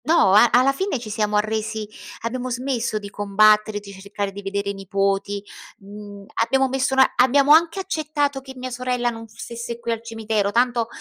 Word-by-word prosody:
No 310 - +4
a 235 +3 +7
alla 255 +3 +4
fine 380 +1 -2
ci 230 -3 -8
siamo 210 0 -1
arresi 215 0 -2 0.3
abbiamo 250 +2 -3
smesso 245 -3 -2
di 205 -1 -7
combattere 210 +1 +3
di 200 -1 -12
cercare 200 +1 -5
di 200 +1 -8
vedere 200 0 -3
i - - -6
nipoti, 195 +1 -1 0.4
mhmm, 205 0 -11 0.2
abbiamo 265 +3 +2
messo 265 0 0 0.2
abbiamo 275 +3 +4
anche 330 +3 +4
accettato 300 -6 -2
che 265 0 -11
mia 255 0 -6
sorella 250 0 -1
non 225 -1 -9
stesse 235 +1 -7
qui 235 - -3
al 225 -1 -2
cimitero 220 -3 -1
tanto 240 0 +1
225 Hz, 175 wpm, -22 LUFS, 205-255 Hz, 0.4 s, a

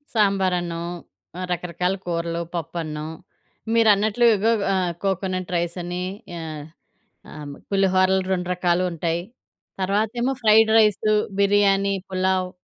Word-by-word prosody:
సాంబార్ 195 -3 +2
అన్నం, 170 -1 -4 0.7
రకరకాల 180 +1 -1
కూరలు, 170 -1 -2
పప్పన్నం. 155 -2 -4 0.7
మీరన్నట్లు 220 0 +4
ఇగో 215 +3 +2 0.2
ఆహ్, 185 -2 0
కోకోనట్ 185 -1 -2
రైసని 175 +1 -2 0.4
ఆహ్, 155 -2 -6 0.7
ఆహ్, 150 -1 -8 0.2
పులిహోరలు 190 -1 +3
2 180 -1 -2
రకాలు 180 0 +1
ఉంటాయి. 170 +1 -2 0.6
తర్వాతేమో 220 +7 0
ఫ్రైడ్ 220 0 +6
రైస్ 215 -1 +3 0.3
బిర్యానీ, 200 0 +3 0.2
పులావ్. 185 0 0
185 Hz, 100 wpm, -23 LUFS, 170-200 Hz, 0.7 s, ఫ్రైడ్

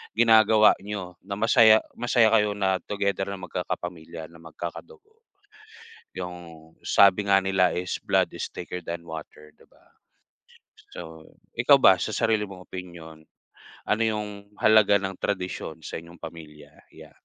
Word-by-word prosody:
ginagawa 110 -2 +6
nyo 100 -3 -6
na 100 +1 -6
masaya 110 -1 +5 0.2
masaya 120 -2 +3
kayo 105 -2 +3
na 95 -2 0
together 100 -1 -2
na 100 - -4
magkakapakapamilya 85 -2 -6
na 85 - -16
magkakadugo 415 - -10 1.0
yung 85 -3 -9 0.2
sabi 100 +1 +4
nga 95 0 +4
nila 95 -2 +1
is 90 0 -3
blood - - +1
is - - -4
thicker 90 0 -7
than 85 0 -6
water, 75 -1 -10
di - - -21
ba? - - -27 1.1
So, 80 0 -11 0.2
ikaw 135 +4 +6
ba 95 -5 +7
sa 110 - -3
sarili 110 -2 +1
mong 95 -2 -12
opinyon, 85 -3 -10 0.7
ano 105 - +1
yung 105 -1 -2 0.3
halaga 110 -2 +5
ng 95 0 -4
tradisyon 90 -5 -4
sa - - -5
inyong 85 +1 -15
pamilya 80 -2 -11 0.2
ya? - - -14
95 Hz, 140 wpm, -25 LUFS, 85-105 Hz, 1.1 s, ba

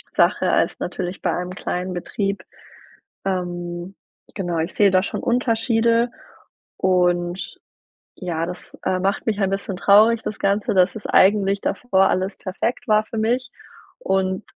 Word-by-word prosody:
Sache - - +3
als - - +1
natürlich 180 +1 -4
bei - - 0
einem 180 0 -3
kleinen 185 0 -3
Betrieb. 195 +3 -3 0.8
Ähm, 175 -1 -3 0.4
genau, 175 -4 -2
ich 165 +3 -2
sehe 200 -2 +5
da 185 0 +3
schon - - -4
Unterschiede 230 -1 +2 0.7
und 175 -1 0 0.6
ja, 165 -3 -2
das, 180 +1 -9
äh, 185 -1 +1
macht 195 +2 -1
mich 215 -2 0
ein 195 - +2
bisschen 195 0 -3
traurig, 215 +4 +5
das 210 - -5
Ganze, 200 +2 +1
dass 185 -1 +4
es 215 - -8
eigentlich 200 0 +4
davor 195 -6 +2
alles 190 +2 -1
perfekt 215 +5 -3
war 215 -1 +3
für 225 - -7
mich 245 +4 0 0.5
und 190 - 0
195 Hz, 145 wpm, -22 LUFS, 180-215 Hz, 0.8 s, sehe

